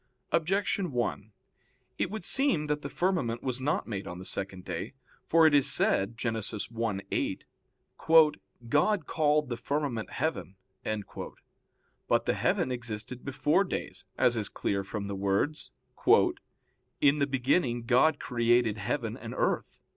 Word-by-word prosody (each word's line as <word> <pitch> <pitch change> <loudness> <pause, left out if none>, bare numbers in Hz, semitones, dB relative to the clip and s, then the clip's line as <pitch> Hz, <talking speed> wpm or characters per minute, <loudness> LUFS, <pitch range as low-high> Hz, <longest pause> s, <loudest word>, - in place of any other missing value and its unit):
Objection 190 +1 0
1: 115 -3 -2 0.7
It - - 0
would 210 -3 -6
seem 265 - +2
that 150 0 -1
the 140 - -5
firmament 145 -7 -1
was 130 -1 -2
not 150 +8 0
made 100 -4 -4
on 90 - -6
the 90 - -9
second 95 -1 -5
day. 90 +5 -5 0.3
For 165 0 +5
it 155 - +5
is 140 -1 +5
said 105 -2 +2
(Gen. 120 -2 -1
1:8): 110 -1 -3 1.2
"God 155 - +2
called 150 -2 +1
the 120 - -3
firmament 135 -3 -2
heaven." 155 - -3 1.5
But - - +2
the - - +2
heaven 130 - 0
existed 120 0 -5
before 140 +6 +2
days, 180 - -5
as 120 - +4
is 110 -3 -1
clear 100 -1 -2
from 100 +1 -5
the 100 0 -4
words, 100 +10 0 1.3
"In 145 +1 +4
the 140 - +2
beginning 125 -2 +1
God 130 +6 +3
created 120 -2 +2
heaven 115 +1 -2
and - - -8
earth." - - -1
125 Hz, 140 wpm, -29 LUFS, 110-150 Hz, 1.5 s, For